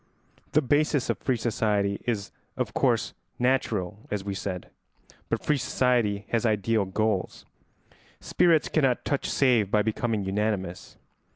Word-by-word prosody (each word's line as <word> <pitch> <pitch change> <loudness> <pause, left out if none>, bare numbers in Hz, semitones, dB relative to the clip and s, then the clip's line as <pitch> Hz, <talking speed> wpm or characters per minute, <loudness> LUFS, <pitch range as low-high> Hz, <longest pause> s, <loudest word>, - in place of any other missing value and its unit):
The 150 - +4
basis 145 0 +2
of - - -5
free 130 -3 0
society 105 -3 0
is 105 -4 -2 0.3
of - - -2
course - - +1 0.2
natural, 110 -6 -1
as 105 -2 -2
we 100 0 -3
said, 95 -2 -5 0.6
but - - -2
free 150 - +2
society 120 -5 +1
has 115 0 +1
ideal 110 -1 +1
goals. 100 0 -1 0.7
Spirits 170 -3 +3
cannot 135 -6 +1
touch 140 - -1
save 120 -7 +3
by 105 0 +3
becoming 110 -1 -1
unanimous. 95 -2 -2
110 Hz, 130 wpm, -27 LUFS, 100-125 Hz, 0.7 s, The